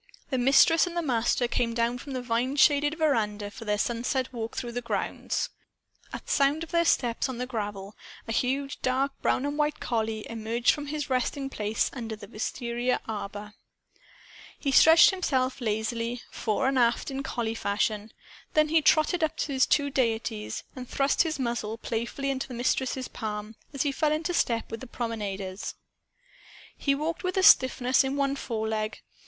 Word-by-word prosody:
The 260 - +1
Mistress 280 +7 +5
and 345 0 -5
the 345 - 0
Master 240 -2 +1
came 235 -1 -1
down 235 +1 0
from 275 +2 -8
the 255 -1 -3
vine 245 +3 0
shaded 290 +1 +4
veranda 215 -10 0
for 225 - -10
their 210 -1 +1
sunset 245 +4 -1
walk 230 -1 -5
through 240 -2 -3
the 245 +1 -3
grounds. 235 - -2 0.6
At - - -8
sound 285 +3 +2
of 330 - -9
their 340 -1 +3
steps 240 -3 +1
on 255 - -4
the 250 - -2
gravel, 205 -4 -5 0.3
a - - -3
huge 270 +4 -1
dark 265 +2 +1
brown 260 - +1
and 290 +1 -3
white 300 0 +1
collie 220 -2 -2
emerged 230 +1 +1
from 295 -1 -4
his 295 -1 -4
resting 270 +2 -1
place 210 -1 -1
under 225 -4 -5
the 210 -1 -11
wistaria 240 +3 -2
arbor. 205 -1 -6 1.0
He 280 - -1
stretched 325 +4 +8
himself 270 -9 -1
lazily, 230 +2 -2
fore 235 +4 -1
and 270 -1 +2
aft, 235 +3 +2
in 270 0 -3
collie 235 -4 -2
fashion. 210 0 -1 0.4
Then 305 0 +4
he 320 0 +4
trotted 310 +3 +3
up 315 - 0
to 285 - -2
his 260 -1 +3
two 285 -1 +2
deities 225 -4 -1
and 255 -2 -8
thrust 275 0 +2
his 325 -2 0
muzzle 235 -4 -2
playfully 235 +5 -3
into 265 -1 -3
the 255 - -7
Mistress's 255 +1 -1
palm, 210 -1 -5 0.2
as 275 -3 -1
he 285 - +1
fell 300 +2 +1
into 325 +3 -1
step 230 -9 0
with 225 - -4
the 260 - -9
promenaders. 205 -5 -4 1.0
He 275 -1 +1
walked 310 +4 -3
with 365 +1 -2
a 380 - +3
stiffness 260 -5 +6
in 270 +1 -2
one 275 -1 +1
foreleg. 220 -4 -3
250 Hz, 175 wpm, -27 LUFS, 225-280 Hz, 1.0 s, stretched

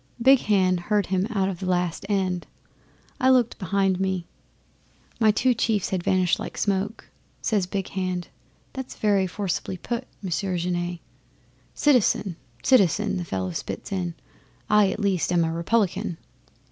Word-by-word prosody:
'Big 265 +2 +6
Hand 185 -5 +2
heard 205 +2 +1
him 190 +1 0
out 200 -4 +1
to 195 - -1
the 185 - -1
last 180 +1 -1
end. 185 -3 0 0.7
I 260 -1 +4
looked 250 -3 +3
behind 195 -1 +1
me, 190 -2 -1 0.9
and - - -31
my 220 - +6
two 245 +4 +3
chiefs 220 -4 0
had 185 -2 0
vanished 185 0 +2
like - - -6
smoke. 200 +2 -2 0.3
Says 205 -5 0
Big 195 0 -3
Hand, 185 -2 -3 0.4
"That 265 -1 -5
is - - -10
very 200 -3 +2
forcibly 185 0 -3
put, 235 +7 -4 0.2
Monsieur 185 0 -1
Genet 175 0 -2 0.4
" - - -35
'"Citizen 235 - +3 0.3
citizen!" 205 -4 +3
the 175 - -3
fellow 95 - -3
spits 90 - -5
in. 180 -3 -2 0.6
"I, 210 -2 +5
at - - -3
least, 195 -5 +1
am 175 -1 +3
a 165 0 -1
Republican!" 190 +1 0
190 Hz, 160 wpm, -25 LUFS, 180-210 Hz, 0.9 s, Big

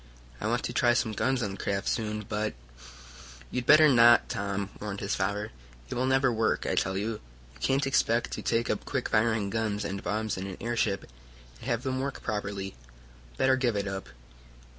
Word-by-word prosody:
I - - -1
want - - 0
to - - -3
try 120 0 +3
some 115 -2 +1
guns 130 +3 0
on 100 - -2
the 95 - -7
craft 100 +1 -2
soon, 105 -2 -1
but 105 0 -2 0.5
" - - -17
"You'd 125 0 -3
better 155 +1 +8
not, 120 -3 +6
Tom," 100 0 -2
warned 100 -1 -4
his 100 - -2
father. 100 +2 -1 0.4
"It - - -1
will 130 +2 0
never 130 -1 +3
work, 110 0 +1
I - - 0
tell 95 +1 0
you. 105 +2 -3 0.3
You 65 - -19
can't 135 - +1
expect 120 -3 +2
to - - -4
take 115 0 +1
up 105 - -1
quick 130 -3 -2
firing 110 -2 +2
guns 110 -2 -1
and 100 0 -3
bombs 110 0 -1
in 95 +1 -4
an 95 - -7
airship, 115 -4 0 0.5
and - - -10
have 120 -1 0
them 130 -1 -1
work 135 +1 -4
properly. 100 -3 -3 0.6
Better 130 0 +4
give 125 -4 0
it 100 -1 -1
up." 95 -1 -5
110 Hz, 200 wpm, -28 LUFS, 100-120 Hz, 0.6 s, better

